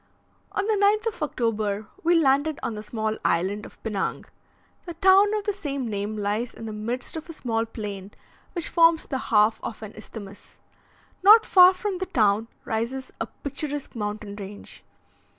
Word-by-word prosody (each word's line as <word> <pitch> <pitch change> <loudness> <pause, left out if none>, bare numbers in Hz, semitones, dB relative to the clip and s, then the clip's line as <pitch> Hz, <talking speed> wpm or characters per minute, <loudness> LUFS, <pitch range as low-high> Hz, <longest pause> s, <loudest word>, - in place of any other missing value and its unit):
On 395 - 0
the 440 - +2
9th 420 +2 +2
of - - -15
October 220 -7 -1 0.2
we 345 +1 +4
landed 290 0 +2
on 230 - -2
the 210 - -6
small 220 0 -3
island 190 +5 0
of - - -18
Pinang. 210 -4 -2 0.6
The 345 - -6
town 390 +1 +5
of 420 - -2
the 415 - -1
same 280 -9 -4
name 210 0 -3
lies 210 +4 -2
in 225 - -8
the 220 - -5
midst 235 +7 -4
of 320 +2 -8
a - - -6
small 230 -6 -2
plain, 205 -4 -6 0.4
which 345 -3 -3
forms 330 -1 +4
the 265 - -3
half 215 0 +4
of 225 - -6
an 215 0 -8
isthmus. 205 -2 -11 0.6
Not 435 +4 +8
far 365 0 +7
from 370 0 -3
the 375 - -3
town 215 -1 +2 0.2
rises 235 +4 -3
a - - -1
picturesque 290 -1 -5
mountain 210 -1 -4
range. 200 0 -10
235 Hz, 170 wpm, -25 LUFS, 210-335 Hz, 0.6 s, Not